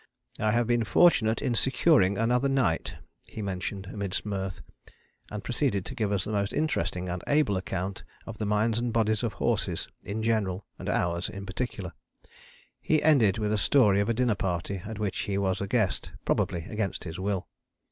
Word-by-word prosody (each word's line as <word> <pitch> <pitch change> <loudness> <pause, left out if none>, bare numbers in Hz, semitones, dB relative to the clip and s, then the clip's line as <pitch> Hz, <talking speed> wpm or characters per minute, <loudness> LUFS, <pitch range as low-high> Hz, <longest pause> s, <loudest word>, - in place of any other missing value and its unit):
"I 110 - +2
have 120 +2 +2
been 120 0 +2
fortunate 115 - +4
in 125 - +1
securing 125 - +3
another 125 +4 +2
night," 125 -12 +1 0.3
he 110 - -6
mentioned 95 0 -4
amidst 100 -1 -4
mirth, 95 -3 -3 0.7
and 105 0 -6
proceeded 120 -6 0
to - - -5
give 110 -6 -1
us 100 -3 +1
the - - -4
most 100 -2 0
interesting 145 - -1
and 90 0 -4
able 145 -8 +3
account 95 +1 -3 0.2
of - - -8
the 105 - -1
minds 110 +2 +2
and 120 0 -1
bodies 110 -2 +1
of 115 -4 -1
horses - - -1
in 110 +2 -4
general 105 -4 0
and - - -4
ours 85 +2 0
in 100 -2 -7
particular. 95 -2 -4 0.9
He 155 - +1
ended 120 -11 +5
with 105 -1 0
a 105 - +1
story 105 -5 +4
of 100 - +1
a 115 - +1
dinner 125 -1 +2
party 95 0 -2
at 110 0 -6
which 105 -3 -2
he 100 -1 -1
was 95 -1 0
a 100 - -2
guest, 110 -3 0
probably 85 -2 0
against 105 -3 -3
his 85 0 -6
will. 95 -1 -2
105 Hz, 185 wpm, -28 LUFS, 95-115 Hz, 0.9 s, ended